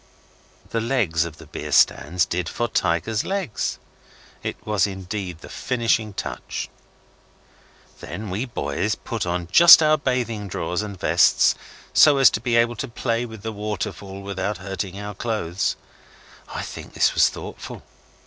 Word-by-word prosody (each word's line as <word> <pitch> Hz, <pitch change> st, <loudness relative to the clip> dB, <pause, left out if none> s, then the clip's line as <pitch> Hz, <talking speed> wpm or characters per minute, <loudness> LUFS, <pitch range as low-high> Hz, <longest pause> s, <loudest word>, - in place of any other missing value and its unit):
The 115 Hz, -, 0 dB
legs 105 Hz, -10 st, +1 dB
of 80 Hz, -2 st, -8 dB
the 80 Hz, -, -13 dB
beer 75 Hz, -, -7 dB
stands 80 Hz, +4 st, +3 dB
did 85 Hz, 0 st, -2 dB
for 120 Hz, -, -2 dB
tigers' 105 Hz, +4 st, 0 dB
legs. 190 Hz, -, -2 dB, 0.6 s
It -, -, -4 dB
was 105 Hz, -3 st, +2 dB
indeed 95 Hz, -3 st, -5 dB
the -, -, -10 dB
finishing 115 Hz, -4 st, 0 dB
touch. -, -, -5 dB, 1.3 s
Then 105 Hz, -2 st, -6 dB
we 105 Hz, +7 st, -2 dB
boys 100 Hz, -, -2 dB
put 110 Hz, -6 st, -4 dB
on 90 Hz, -1 st, -2 dB
just 170 Hz, -, +10 dB
our 155 Hz, 0 st, +4 dB
bathing 120 Hz, -6 st, -1 dB
drawers 90 Hz, 0 st, -2 dB
and 100 Hz, -3 st, -7 dB
vests -, -, +4 dB, 0.4 s
so 145 Hz, -2 st, +7 dB
as 135 Hz, -2 st, +7 dB
to 110 Hz, -, -2 dB
be 120 Hz, 0 st, 0 dB
able 120 Hz, 0 st, +3 dB
to 135 Hz, -, -3 dB
play 120 Hz, 0 st, -2 dB
with 110 Hz, -3 st, -11 dB
the 110 Hz, -, -4 dB
waterfall 100 Hz, -1 st, -5 dB
without 100 Hz, +1 st, -3 dB
hurting 95 Hz, 0 st, -5 dB
our 105 Hz, 0 st, -6 dB
clothes. 95 Hz, -5 st, -2 dB, 0.7 s
I -, -, -5 dB
think -, -, -9 dB
this -, -, +3 dB
was -, -, +5 dB
thoughtful. -, -, -9 dB
105 Hz, 150 wpm, -23 LUFS, 90-115 Hz, 1.3 s, just